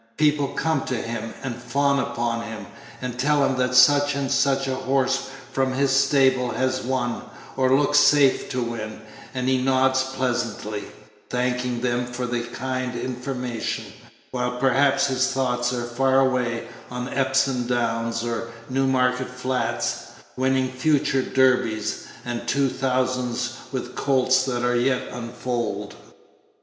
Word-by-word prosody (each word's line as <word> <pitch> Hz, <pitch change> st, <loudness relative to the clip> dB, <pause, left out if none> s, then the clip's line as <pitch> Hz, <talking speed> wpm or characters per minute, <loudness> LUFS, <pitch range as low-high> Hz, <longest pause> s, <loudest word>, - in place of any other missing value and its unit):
People 150 Hz, -2 st, +3 dB
come 160 Hz, +3 st, 0 dB
to 130 Hz, -, -2 dB
him, 115 Hz, -1 st, -4 dB
and 120 Hz, -2 st, -5 dB
fawn 140 Hz, +3 st, +1 dB
upon 120 Hz, -4 st, -1 dB
him, 110 Hz, -3 st, -7 dB, 0.4 s
and 125 Hz, -1 st, -4 dB
tell 145 Hz, +1 st, +3 dB
him 135 Hz, -, +1 dB
that 125 Hz, 0 st, +1 dB
such 145 Hz, +2 st, +6 dB
and 140 Hz, -1 st, -2 dB
such 135 Hz, 0 st, +2 dB
a 130 Hz, -, 0 dB
horse 135 Hz, 0 st, 0 dB, 0.2 s
from 130 Hz, -1 st, +1 dB
his 135 Hz, +1 st, +1 dB
stable 130 Hz, -2 st, +3 dB
has 130 Hz, +1 st, 0 dB
won, 120 Hz, -2 st, -1 dB, 0.3 s
or 130 Hz, 0 st, +3 dB
looks 145 Hz, 0 st, +4 dB
safe 145 Hz, -3 st, +4 dB
to 125 Hz, -1 st, -1 dB
win; 110 Hz, -2 st, -5 dB, 0.4 s
and 125 Hz, 0 st, -1 dB
he 130 Hz, 0 st, +3 dB
nods 130 Hz, 0 st, +3 dB
pleasantly, 120 Hz, -5 st, -2 dB, 0.4 s
thanking 125 Hz, -1 st, -1 dB
them 120 Hz, 0 st, 0 dB
Page 120 Hz, -, -9 dB
66 -, -, -6 dB
for 125 Hz, -, -1 dB
the 120 Hz, -1 st, -2 dB
kind 130 Hz, -1 st, -2 dB
information, 125 Hz, -2 st, -3 dB, 0.5 s
while 125 Hz, -1 st, -2 dB
perhaps 135 Hz, +2 st, +3 dB
his 130 Hz, -1 st, +1 dB
thoughts 125 Hz, -2 st, 0 dB
are 120 Hz, -1 st, -2 dB
far 130 Hz, +2 st, +2 dB
away 125 Hz, -3 st, 0 dB, 0.2 s
on 125 Hz, 0 st, -4 dB
Epsom 135 Hz, -2 st, +1 dB
Downs 115 Hz, -1 st, -1 dB
or 115 Hz, 0 st, -3 dB, 0.2 s
Newmarket 130 Hz, -1 st, +1 dB
Flats, 125 Hz, -2 st, -2 dB, 0.3 s
winning 130 Hz, 0 st, +1 dB
future 135 Hz, 0 st, +2 dB
Derbys 130 Hz, -5 st, +1 dB, 0.2 s
and 120 Hz, 0 st, -4 dB
two 140 Hz, +2 st, +2 dB
thousands 130 Hz, -2 st, -1 dB, 0.2 s
with -, -, -5 dB
colts 130 Hz, -1 st, +2 dB
that 125 Hz, -2 st, -2 dB
are 125 Hz, 0 st, +2 dB
as 120 Hz, 0 st, +2 dB
yet 130 Hz, -1 st, 0 dB
unfoaled. 115 Hz, -4 st, -4 dB
130 Hz, 145 wpm, -24 LUFS, 120-135 Hz, 0.5 s, such